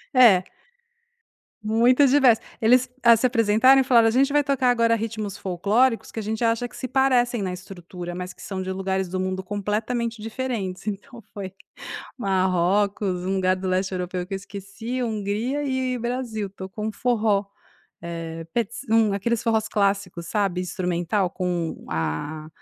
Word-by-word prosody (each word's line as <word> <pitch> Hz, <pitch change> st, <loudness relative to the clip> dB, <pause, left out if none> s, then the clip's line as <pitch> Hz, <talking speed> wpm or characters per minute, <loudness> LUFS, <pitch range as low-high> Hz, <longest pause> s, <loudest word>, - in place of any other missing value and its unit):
É. 215 Hz, -8 st, +7 dB, 1.2 s
Muito 235 Hz, +6 st, +4 dB
diverso. 260 Hz, -4 st, +5 dB, 0.2 s
Eles 250 Hz, +3 st, +4 dB
a 235 Hz, -1 st, +7 dB
se 230 Hz, -, 0 dB
apresentaram 245 Hz, +2 st, +5 dB
e -, -, +1 dB
falaram: 235 Hz, -3 st, +5 dB
"A -, -, +3 dB
gente 270 Hz, +4 st, +3 dB
vai 295 Hz, 0 st, +3 dB
tocar 275 Hz, -3 st, +1 dB
agora 230 Hz, -1 st, +3 dB
ritmos 220 Hz, -3 st, -4 dB
folclóricos 210 Hz, +7 st, +1 dB
que -, -, -5 dB
a -, -, -2 dB
gente 220 Hz, +3 st, -2 dB
acha 230 Hz, +1 st, +1 dB
que -, -, -16 dB
se 255 Hz, -, -4 dB
parecem 250 Hz, -3 st, +2 dB
na 190 Hz, -2 st, -2 dB
estrutura, 180 Hz, -1 st, -8 dB
mas 180 Hz, 0 st, -6 dB
que -, -, -17 dB
são 190 Hz, -2 st, -5 dB
de 185 Hz, 0 st, -4 dB
lugares 190 Hz, 0 st, -1 dB
do 185 Hz, +1 st, -3 dB
mundo 185 Hz, 0 st, -2 dB
completamente 215 Hz, +4 st, -2 dB
diferentes". 220 Hz, -5 st, -4 dB
Então 220 Hz, +4 st, -6 dB
foi 190 Hz, -2 st, -6 dB, 0.6 s
Marrocos, 190 Hz, -1 st, +1 dB
um 190 Hz, +1 st, 0 dB
lugar 185 Hz, -1 st, +2 dB
do 185 Hz, 0 st, -5 dB
Leste 185 Hz, +1 st, 0 dB
Europeu 180 Hz, 0 st, -3 dB
que 195 Hz, -, -7 dB
eu -, -, 0 dB
esqueci, 200 Hz, +6 st, -6 dB
Hungria 220 Hz, +5 st, -2 dB
e 260 Hz, -2 st, -1 dB
Brasil, 235 Hz, -4 st, -3 dB
tocou 190 Hz, +2 st, -7 dB
um 220 Hz, -, -1 dB
forró. 215 Hz, -3 st, +1 dB, 0.6 s
Eh, 165 Hz, -1 st, -6 dB
pets 230 Hz, -1 st, -2 dB
hum, 220 Hz, -2 st, +4 dB
aqueles 225 Hz, +3 st, 0 dB
forros 220 Hz, -2 st, +1 dB
clássicos, 195 Hz, -5 st, -1 dB
sabe. 195 Hz, -3 st, 0 dB
Instrumental 180 Hz, +1 st, -1 dB
com 175 Hz, -3 st, -3 dB
a 115 Hz, -, -3 dB
210 Hz, 160 wpm, -24 LUFS, 185-235 Hz, 1.2 s, É